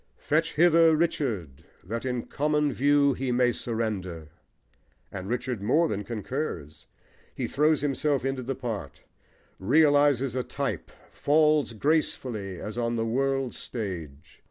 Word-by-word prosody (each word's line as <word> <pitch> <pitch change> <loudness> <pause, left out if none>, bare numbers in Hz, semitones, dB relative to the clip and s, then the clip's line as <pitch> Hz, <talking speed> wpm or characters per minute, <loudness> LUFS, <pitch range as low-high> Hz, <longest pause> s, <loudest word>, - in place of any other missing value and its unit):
Fetch 165 +2 0
hither 165 0 +5
Richard 115 - -2 0.2
that 115 +7 -5
in 125 -2 -2
common 150 -1 0
view 140 +1 +3
He 130 0 -2
may 125 0 +3
surrender! 100 -10 -4 0.8
And 95 0 -6
Richard 125 -2 -2
more 150 +11 +3
than 105 -7 -3
concurs: 105 - -5 0.5
he - - -2
throws 150 +1 +2
himself 145 -1 0
into 135 -1 -1
the 130 +2 -3
part, 120 -6 -6 0.6
realises 145 +1 +3
a 130 - 0
type, - - -4 0.2
falls 150 -3 +2
gracefully 115 - -1
as 105 +3 -5
on 120 0 0
the 115 -1 -1
world's 135 +2 -1
stage. 85 - -7
125 Hz, 130 wpm, -27 LUFS, 105-145 Hz, 0.8 s, hither